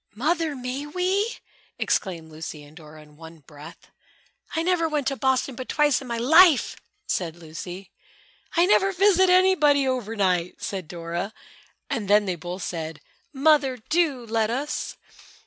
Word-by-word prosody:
"Mother! 315 +5 0
May 255 +3 -5
we?" 375 +7 -1 0.4
exclaimed 165 -6 -2
Lucy 155 -1 -8
and 145 +1 -16
Dora 155 -2 -13
in 150 0 -20
one 160 0 -13
breath. 150 +3 -14 0.6
"I 325 - 0
never 340 -2 +1
went 300 -3 -1
to 275 - -3
Boston 265 +2 0
but 255 +1 -8
twice 295 -2 +2
in 265 - -9
my 235 -1 -3
life," 320 +5 +5 0.3
said 170 -3 -2
Lucy. 175 +3 -9 0.7
"I 340 - +6
never 390 0 +3
visited 375 0 +4
anybody 315 -7 +4
over 245 -4 -2
night," 180 -4 0
said 190 -5 -5
Dora 170 +5 -5 0.5
and 210 -4 -3
then 205 +1 +4
they 185 - -1
both 175 +3 -7
said, 160 -3 -5 0.3
"Mother, 275 -2 +3
do 310 -7 +1
let 225 -1 0
us!" 275 +5 -3
245 Hz, 150 wpm, -24 LUFS, -, 0.7 s, I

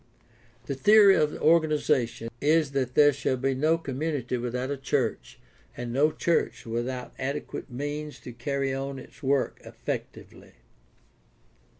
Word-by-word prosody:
The - - -3
theory 200 +7 +6
of 150 - +3
the - - -8
organization 150 -8 +2
is 155 0 +3
that 130 -2 -2
there 145 -1 +6
shall 130 -1 -1
be 135 +1 0
no 155 +5 +2
community 140 -4 -3
without 125 +2 -3
a 140 - -2
church 135 -3 -2 0.4
and 120 -1 -4
no 150 +4 +3
church 170 +2 0
without 120 +2 -4
adequate 140 +2 -4
means 145 +3 -5
to 125 - -9
carry 135 +3 -2
on 135 0 -4
its 130 - -13
work 135 -1 0
effectively. - - -7
140 Hz, 135 wpm, -27 LUFS, 125-150 Hz, 0.4 s, theory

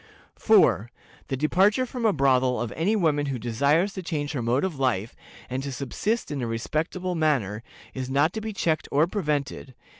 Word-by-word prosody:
"4. 120 - +4 0.4
The 135 - -2
departure 195 - +3
from 245 -2 -1
a - - +4
brothel 130 -5 +2
of 120 -2 -3
any 190 +7 0
woman 150 -7 +1
who 135 -2 -2
desires 140 - +1
to 190 - -5
change 150 -4 -3
her 140 -5 -3
mode 120 +4 +1
of 175 -7 -3
life, 115 -5 0 0.3
and 130 +1 -3
to 140 0 -5
subsist 150 - -2
in 140 -2 -3
a 120 - -2
respectable 155 +10 -2
manner, 135 - 0 0.3
is 130 -1 -5
not 145 +5 +2
to 220 - -4
be 220 0 -4
checked 165 -6 -1
or 150 +3 +4
prevented. 150 - -3
145 Hz, 185 wpm, -25 LUFS, 130-180 Hz, 0.4 s, 4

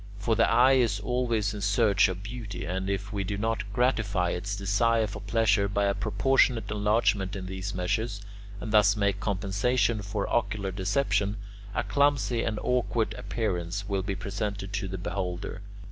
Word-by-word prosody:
For 110 +2 0
the 115 - +3
eye 130 +2 +5
is 115 -5 +2
always 115 -2 0
in 105 - -6
search 100 0 +3
of 95 0 -5
beauty, 110 -4 -6
and 95 +2 -2
if 100 +1 -3
we 100 -1 -1
do 100 +2 -3
not 105 -1 -2
gratify 105 -7 +1
its 100 +3 -3
desire 110 +3 +2
for 105 - -6
pleasure 105 -3 +2
by 100 0 0
a 100 - +2
proportionate 115 0 +2
enlargement 105 -2 +1
in 95 -1 -5
these 95 +1 -5
measures, 100 +4 -1 0.4
and 105 +2 -5
thus 105 -1 +5
make 100 -1 +1
compensation 105 +4 0
for 100 0 -3
ocular 105 -4 -1
deception, 100 +1 0 0.4
a - - +1
clumsy 140 -4 +2
and 110 -2 -1
awkward 120 -2 0
appearance 100 -6 -3
will 100 -2 0
be 100 +1 -3
presented 100 0 -4
to 100 -2 -2
the 95 0 -5
beholder. 90 +1 -4
105 Hz, 165 wpm, -28 LUFS, 100-115 Hz, 0.4 s, eye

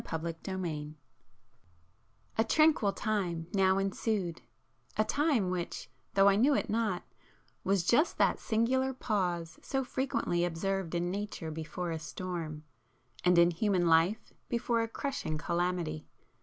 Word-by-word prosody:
[p 165 - -4
342]XXIX 165 -2 -4 1.4
A 225 - +3
tranquil 300 -4 +4
time 185 -7 -1
now 190 -1 +4
ensued; 195 -2 -1 0.6
a 215 - +4
time 275 - +1
which, 175 -7 -4 0.2
though 195 0 +6
I 200 0 +5
knew 275 +6 +4
it - - -1
not, 215 -5 0 0.6
was 195 -2 +2
just 245 - +3
that - - +3
singular 260 +4 +1
pause 175 -8 -1
so 270 0 -1
frequently 245 -9 -1
observed 175 +1 -1
in 175 +1 0
nature 200 -5 -4
before 160 +3 -4
a 160 - -3
storm, 155 0 -5 0.6
and 180 0 +4
in 170 0 +6
human 185 0 +1
life 165 +6 +3 0.2
before 235 -1 +1
a 225 - -1
crushing 245 - -3
calamity. 170 -1 -1
185 Hz, 130 wpm, -31 LUFS, 170-220 Hz, 1.4 s, though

